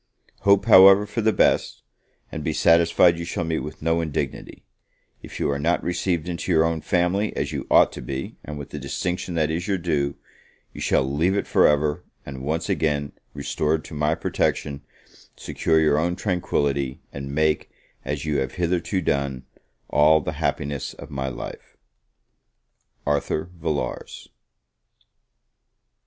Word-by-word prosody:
Hope, 100 Hz, 0 st, +4 dB
however, 95 Hz, -1 st, +8 dB
for 110 Hz, +3 st, -3 dB
the 110 Hz, 0 st, +3 dB
best, -, -, +1 dB, 0.5 s
and -, -, -5 dB
be -, -, -1 dB
satisfied 85 Hz, +1 st, +4 dB
you -, -, -4 dB
shall 85 Hz, 0 st, -3 dB
meet 80 Hz, -1 st, -1 dB
with 75 Hz, 0 st, -8 dB
no 80 Hz, +1 st, +1 dB
indignity; 75 Hz, -4 st, -4 dB, 0.6 s
if -, -, -9 dB
you -, -, 0 dB
are 70 Hz, -, -2 dB
not 85 Hz, +4 st, +1 dB
received 90 Hz, -1 st, -1 dB
into 90 Hz, +1 st, -3 dB
your 80 Hz, -2 st, +4 dB
own 80 Hz, -1 st, -1 dB
family 90 Hz, +6 st, 0 dB
as 70 Hz, +1 st, -2 dB
you 70 Hz, -3 st, -5 dB
ought -, -, +5 dB
to -, -, -8 dB
be, 65 Hz, +2 st, -5 dB
and 75 Hz, 0 st, -7 dB
with 70 Hz, -, -8 dB
the 75 Hz, -, -5 dB
distinction 90 Hz, +6 st, -3 dB
that 80 Hz, -1 st, +1 dB
is 85 Hz, +3 st, -3 dB
your 100 Hz, -2 st, +1 dB
due, 75 Hz, -5 st, -1 dB, 0.6 s
you -, -, -9 dB
shall -, -, +2 dB
leave 75 Hz, +8 st, 0 dB
it -, -, -1 dB
for -, -, +4 dB
ever; 75 Hz, 0 st, +1 dB, 0.2 s
and 65 Hz, -2 st, -7 dB
once 80 Hz, +5 st, -2 dB
again 75 Hz, -2 st, 0 dB, 0.2 s
restored 75 Hz, +2 st, -1 dB
to -, -, -10 dB
my 75 Hz, +1 st, +1 dB
protection, 70 Hz, -3 st, -1 dB, 0.5 s
secure 80 Hz, -1 st, 0 dB
your 75 Hz, -1 st, +3 dB
own 85 Hz, +2 st, 0 dB
tranquillity, 70 Hz, -9 st, -1 dB
and 70 Hz, 0 st, -6 dB
make, 80 Hz, 0 st, +1 dB, 0.3 s
as 75 Hz, 0 st, -4 dB
you 75 Hz, -2 st, 0 dB
have 65 Hz, -1 st, -3 dB
hitherto 90 Hz, +1 st, -1 dB
done, 70 Hz, -5 st, -1 dB, 0.4 s
all 75 Hz, +1 st, +5 dB
the 75 Hz, -, -4 dB
happiness 70 Hz, -2 st, -2 dB
of 70 Hz, +1 st, -11 dB
my 65 Hz, -1 st, -3 dB
life. 65 Hz, -, -8 dB, 1.3 s
ARTHUR 75 Hz, +3 st, -1 dB
VILLARS. 75 Hz, -7 st, -4 dB
80 Hz, 155 wpm, -23 LUFS, 70-85 Hz, 1.3 s, however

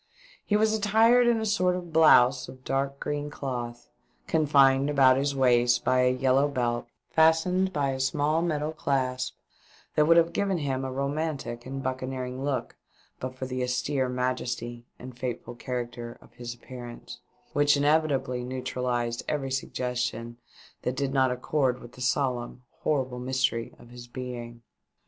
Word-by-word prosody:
He 205 Hz, -, 0 dB
was 215 Hz, 0 st, +3 dB
attired 225 Hz, +3 st, +4 dB
in 235 Hz, -1 st, +3 dB
a 220 Hz, -, -2 dB
sort 185 Hz, -4 st, +2 dB
of 175 Hz, -2 st, -7 dB
blouse 130 Hz, -5 st, +6 dB
of 130 Hz, 0 st, -12 dB
dark 135 Hz, +1 st, -1 dB
green 145 Hz, 0 st, -3 dB
cloth, 120 Hz, -4 st, -5 dB, 0.4 s
confined 140 Hz, -, +4 dB
about 135 Hz, -3 st, +5 dB
his 140 Hz, +1 st, 0 dB
waist 120 Hz, -2 st, +3 dB
by 130 Hz, 0 st, +3 dB
a 125 Hz, -, +4 dB
yellow 130 Hz, +2 st, +3 dB
belt 120 Hz, -4 st, -1 dB, 0.2 s
fastened 165 Hz, +4 st, +3 dB
by 140 Hz, -5 st, 0 dB
a 130 Hz, -, -4 dB
small 150 Hz, +4 st, +1 dB
metal 155 Hz, -3 st, -1 dB
clasp, 130 Hz, -4 st, -1 dB, 0.6 s
that 150 Hz, 0 st, +3 dB
would 165 Hz, +1 st, +6 dB
have 170 Hz, 0 st, +4 dB
given 195 Hz, -2 st, 0 dB
him 135 Hz, -4 st, -2 dB
a 130 Hz, -, -3 dB
romantic 140 Hz, -3 st, -3 dB
and 135 Hz, +1 st, -5 dB
buccaneering 130 Hz, 0 st, -4 dB
look 140 Hz, -2 st, -2 dB, 0.4 s
but 130 Hz, 0 st, -5 dB
for 130 Hz, -, -5 dB
the 130 Hz, 0 st, -3 dB
austere 125 Hz, +1 st, 0 dB
majesty 125 Hz, -1 st, -3 dB
and 125 Hz, 0 st, -11 dB
fateful 120 Hz, -1 st, -4 dB
character 120 Hz, -1 st, -5 dB
of -, -, -20 dB
his 120 Hz, -1 st, -7 dB
appearance, 120 Hz, -1 st, -10 dB, 0.3 s
which 145 Hz, 0 st, +4 dB
inevitably 140 Hz, -4 st, +1 dB
neutralised 125 Hz, -2 st, -2 dB
every 135 Hz, -3 st, -2 dB
suggestion 125 Hz, -3 st, -3 dB, 0.4 s
that 125 Hz, -, -2 dB
did 135 Hz, 0 st, -1 dB
not 130 Hz, -1 st, +3 dB
accord 125 Hz, 0 st, 0 dB
with 120 Hz, -, -12 dB
the 125 Hz, -, -13 dB
solemn, 125 Hz, -1 st, -1 dB, 0.2 s
horrible 130 Hz, -4 st, -1 dB
mystery 130 Hz, -2 st, -1 dB
of 120 Hz, -, -16 dB
his 120 Hz, 0 st, -11 dB
being. 120 Hz, -2 st, -7 dB
130 Hz, 155 wpm, -27 LUFS, 125-145 Hz, 0.6 s, blouse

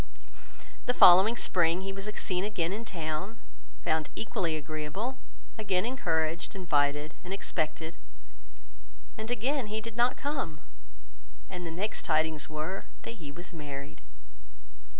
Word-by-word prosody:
The 245 Hz, -, +3 dB
following 190 Hz, +6 st, +9 dB
spring 175 Hz, 0 st, +3 dB
he 195 Hz, 0 st, -3 dB
was 195 Hz, +2 st, -4 dB
seen 180 Hz, 0 st, 0 dB
again 195 Hz, -4 st, 0 dB
in 225 Hz, +3 st, -4 dB
town, 170 Hz, +3 st, -3 dB, 0.5 s
found 155 Hz, -1 st, +1 dB
equally 190 Hz, -7 st, 0 dB
agreeable, 155 Hz, -, -3 dB, 0.4 s
again 190 Hz, -2 st, +2 dB
encouraged, 170 Hz, -, 0 dB
invited, 150 Hz, -4 st, +2 dB
and 180 Hz, -, -7 dB
expected, 160 Hz, -3 st, -2 dB, 1.2 s
and 220 Hz, 0 st, -5 dB
again 245 Hz, +2 st, +1 dB
he 215 Hz, +1 st, -2 dB
did 225 Hz, 0 st, -7 dB
not 240 Hz, +1 st, +3 dB
come; 270 Hz, -, -2 dB, 0.9 s
and 180 Hz, -2 st, -4 dB
the -, -, -3 dB
next 195 Hz, +7 st, -2 dB
tidings 155 Hz, -3 st, +1 dB
were 155 Hz, +5 st, -3 dB, 0.2 s
that 230 Hz, -5 st, -7 dB
he 145 Hz, -2 st, -6 dB
was 175 Hz, +5 st, -8 dB
married. 140 Hz, -, -7 dB
180 Hz, 130 wpm, -30 LUFS, 155-215 Hz, 1.2 s, following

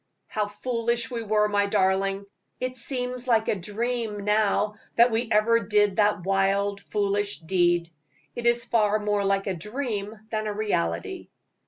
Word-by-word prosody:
"How 210 Hz, -1 st, -1 dB
foolish 235 Hz, +2 st, -1 dB
we 235 Hz, -2 st, -3 dB
were, 210 Hz, -1 st, +2 dB
my 205 Hz, -1 st, +1 dB
darling. 195 Hz, 0 st, +1 dB, 0.3 s
It 255 Hz, 0 st, -3 dB
seems 250 Hz, 0 st, -3 dB
like 225 Hz, -2 st, +2 dB
a -, -, +2 dB
dream 210 Hz, +2 st, -3 dB
now 210 Hz, 0 st, +1 dB, 0.2 s
that 235 Hz, +1 st, +5 dB
we 225 Hz, +1 st, -1 dB
ever 225 Hz, +2 st, +4 dB
did 205 Hz, -2 st, +2 dB
that 205 Hz, -3 st, +2 dB
wild, 195 Hz, +1 st, +1 dB
foolish 205 Hz, 0 st, -1 dB
deed. 175 Hz, 0 st, +1 dB, 0.4 s
It 240 Hz, 0 st, -2 dB
is 235 Hz, 0 st, +3 dB
far 215 Hz, -3 st, +2 dB
more 210 Hz, -1 st, 0 dB
like 195 Hz, 0 st, +1 dB
a 195 Hz, -, -1 dB
dream 210 Hz, -, -4 dB
than 215 Hz, -1 st, -2 dB
a 210 Hz, -, -2 dB
reality." 85 Hz, -, -2 dB
210 Hz, 155 wpm, -25 LUFS, 200-230 Hz, 0.4 s, that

